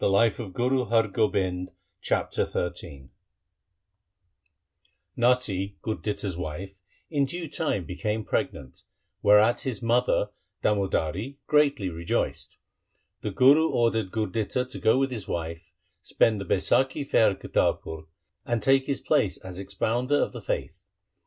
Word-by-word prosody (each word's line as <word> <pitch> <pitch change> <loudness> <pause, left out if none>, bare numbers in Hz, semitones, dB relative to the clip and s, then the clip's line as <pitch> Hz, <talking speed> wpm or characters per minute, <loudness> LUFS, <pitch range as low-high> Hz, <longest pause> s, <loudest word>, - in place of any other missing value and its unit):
This 105 +4 +3
is 110 -6 -5
God's 120 -4 +1
will' 90 -4 0 0.3
Chapter - - 0
XIII 75 -6 -5 2.1
Natti, 115 -6 +1
Gurditta's 105 -4 -3
wife, 90 +3 -6 0.3
in 145 -3 +2
due 170 +4 -4
time 145 - -2
became 105 +5 -3
pregnant, 65 -2 -3 0.4
whereat 105 +3 +5
his 125 -4 -4
mother 115 -3 +2 0.3
Damodari 100 - 0
greatly 140 -11 +2
rejoiced. 85 0 -2 0.6
The - - -2
Guru 145 +5 +5
ordered 115 -4 +1
Gurditta 110 +4 -1
to - - -6
go 110 - +4
with 135 0 +1
his 110 -6 -5
wife, 85 0 -5 0.3
spend 110 -3 +2
the - - -5
Baisakhi 130 - +1
fair 110 - +4
at 95 - -5
Kartarpur, 80 0 -1 0.4
and 120 -3 -1
take 135 +1 +4
his 140 - -1
place - - +1
as 95 -1 -8
expounder 110 +8 0
of - - +1
the - - -7
faith. 90 +4 -4
105 Hz, 125 wpm, -26 LUFS, 95-125 Hz, 2.1 s, whereat